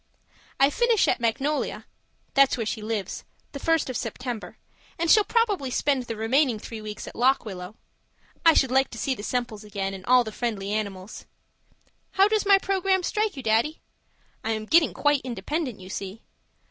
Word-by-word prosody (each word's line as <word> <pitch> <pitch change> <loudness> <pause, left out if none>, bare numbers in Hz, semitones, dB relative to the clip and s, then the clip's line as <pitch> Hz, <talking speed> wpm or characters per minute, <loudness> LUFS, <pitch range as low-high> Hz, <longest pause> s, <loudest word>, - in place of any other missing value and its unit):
I 275 +1 +5
finish 470 0 +3
at - - +1
Magnolia 265 +6 -1 0.5
(that's 275 -2 +4
where 230 - -2
she 215 +1 -3
lives) 210 -3 -4 0.3
the 280 - -7
first 325 +2 +1
of 255 - -4
September, 245 -2 -5 0.4
and 335 -1 +2
shall 425 - +7
probably 410 - +1
spend 260 0 0
the 230 - -5
remaining 240 +3 +2
three 220 +1 -8
weeks 210 0 -7
at - - -9
Lock 260 +2 +2
Willow 185 -1 -7 0.7
I 330 -1 +6
should 265 -2 +3
like 265 +1 +3
to 230 - -9
see 265 +4 0
the 235 - -7
Semples 230 -2 -3
again 200 -2 -4
and 190 -1 -8
all 250 0 +6
the 220 - -6
friendly 210 -4 -3
animals. 200 -2 -4 0.9
How 390 +1 +5
does 425 -1 0
my 400 -1 +7
programme 385 -1 +1
strike 425 -3 -1
you, 270 - -6
Daddy? 230 +8 +1 0.6
I 225 - 0
am 215 0 -4
getting 320 +7 +4
quite 290 -2 +2
independent, 255 - -3
you 185 0 -11
see. 195 +3 -6
250 Hz, 180 wpm, -25 LUFS, 215-305 Hz, 0.9 s, shall